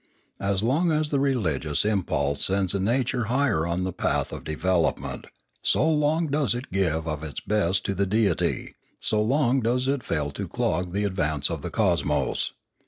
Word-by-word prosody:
As 100 0 0
long 155 +9 +2
as 155 -1 0
the 140 - +2
religious 95 - 0
impulse 85 -9 +1
sends 95 -1 +1
the 100 - 0
nature 120 +3 0
higher 120 - +1
on 85 +2 -1
the 95 -1 -2
path - - -1
of - - -7
development, 75 -6 -1 0.3
so - - +2
long 155 +1 +2
does 140 -7 +1
it 125 +2 -6
give 85 -4 0
of 75 -1 -3
its 75 -4 -5
best 100 -3 0
to 100 - 0
the 100 +1 0
Deity, 105 -3 0 0.2
so 105 -1 +1
long 130 +3 +2
does 125 +3 +1
it 140 -1 +1
fail 75 -8 -2
to - - -5
clog 90 0 -1
the 100 +1 0
advance 80 -7 0
of 80 -3 -3
the - - -4
cosmos. - - 0
100 Hz, 175 wpm, -25 LUFS, 85-130 Hz, 0.3 s, long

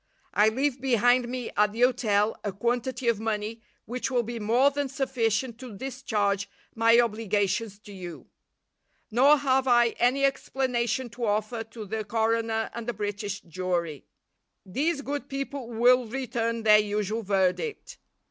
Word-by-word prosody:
I 210 +1 +5
leave 265 +2 -1
behind 245 -1 +3
me 250 -1 -4
at 210 0 +3
the 230 - -4
hotel 225 -4 +2
a 205 - -2
quantity 240 +5 -2
of 230 -3 +2
money 220 0 -3 0.2
which 250 +3 -3
will 245 -2 +1
be 235 +1 -5
more 240 +6 +3
than 285 -1 -2
sufficient 250 -3 -1
to 245 -6 -9
discharge 210 -6 -1 0.2
my 230 +1 +5
obligations 210 -2 0
to 205 - -12
you. 175 -4 -8 0.9
Nor 275 +6 +6
have 265 -1 +1
I 240 -1 +5
any 260 +3 +3
explanation 260 -2 -1
to 240 +1 -4
offer 215 +2 -1
to 225 -1 -9
the 215 +2 -3
coroner 225 +1 0
and 235 -1 -6
the 240 - -1
British 205 -1 -4
jury. 170 -4 -3 0.6
These 280 - -1
good 285 -1 -4
people 275 -2 -5
will 245 +1 +4
return 230 -2 -2
their 210 -1 +7
usual 210 +1 -1
verdict. 195 - -1
230 Hz, 150 wpm, -27 LUFS, 210-255 Hz, 0.9 s, their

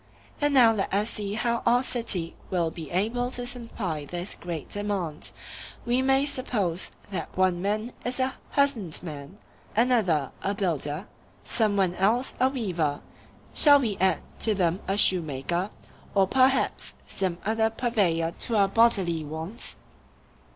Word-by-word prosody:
And 290 -1 +2
now 235 -4 +7
let 200 -3 -2
us 205 +3 +1
see 205 -1 -3
how 235 +1 0
our 245 +2 +3
city 210 -10 -1
will 170 -3 0
be 160 -2 -8
able 225 +7 0
to 245 -1 -3
supply 225 - -4
this 175 +6 -4
great 170 -3 -6
demand: 200 -7 -2 0.5
We 245 +2 +2
may 270 +1 +3
suppose 210 - -1 0.2
that 190 - -5
one 185 -2 +2
man 215 +4 -1
is 250 +2 -3
a 260 0 0 0.2
husbandman, 180 - -1 0.4
another 215 - +2
a 200 +1 -1
builder, 165 -3 -2 0.4
some 215 -3 +1
one 185 -3 +2
else 220 +8 +1
a 260 - +4
weaver—shall 205 - +2
we 225 -7 -1
add 185 -2 +1 0.2
to 220 -2 +3
them 175 -1 +1
a 195 +1 0
shoemaker, 170 0 +2 0.5
or 195 -1 +5
perhaps 260 +5 +1
some 185 -3 -2
other 220 +1 +2
purveyor 200 -9 0
to 235 - -2
our 200 -2 +4
bodily 195 -8 +2
wants? 160 +8 -4
200 Hz, 140 wpm, -26 LUFS, 175-235 Hz, 0.5 s, now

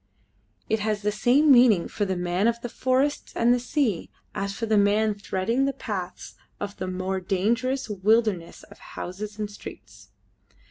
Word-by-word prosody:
It 220 - +1
has 210 0 -1
the 210 - +1
same 255 +8 +4
meaning 240 -8 +6
for 205 - -2
the 190 -1 -1
man 180 +3 0
of 235 0 +1
the 240 - -5
forests 260 +4 0
and 235 +1 +4
the 245 - +1
sea 245 - -1 0.2
as 200 0 -2
for 225 +3 -4
the 220 -1 +1
man 210 +1 +3
threading 205 +5 -1
the 275 - 0
paths 185 -8 -6 0.3
of 205 0 -5
the 185 - -4
more 185 +1 -2
dangerous 230 +8 0
wilderness 210 -3 +1
of - - -16
houses 205 +4 -7
and 210 -1 -2
streets. 205 - -12
210 Hz, 170 wpm, -25 LUFS, 190-240 Hz, 0.3 s, meaning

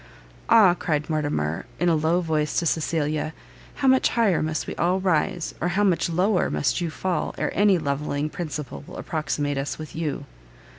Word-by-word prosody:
"Ah!" 210 -6 +7
cried 155 -3 -2
Mortimer, 145 - -1
in 175 - +2
a 170 - +4
low 160 +3 +2
voice 155 -3 -1
to 170 - +1
Cecilia, 155 -1 -1 0.4
"how 275 - 0
much 260 0 +5
higher 225 -7 +2
must 155 0 -2
we - - -5
all 180 +2 +2
rise, 175 -1 0
or - - +1
how 190 +4 +1
much 175 -4 +2
lower 180 +3 +2
must 145 - 0
you 170 - -1
fall, 175 0 -2
ere - - -1
any 200 -1 +4
levelling 145 -1 -2
principle 155 -3 -6
will - - -9
approximate 145 -2 -2
us 140 +1 -3
with 155 -1 -9
YOU!" 150 -3 -3
160 Hz, 180 wpm, -24 LUFS, 150-180 Hz, 0.4 s, Ah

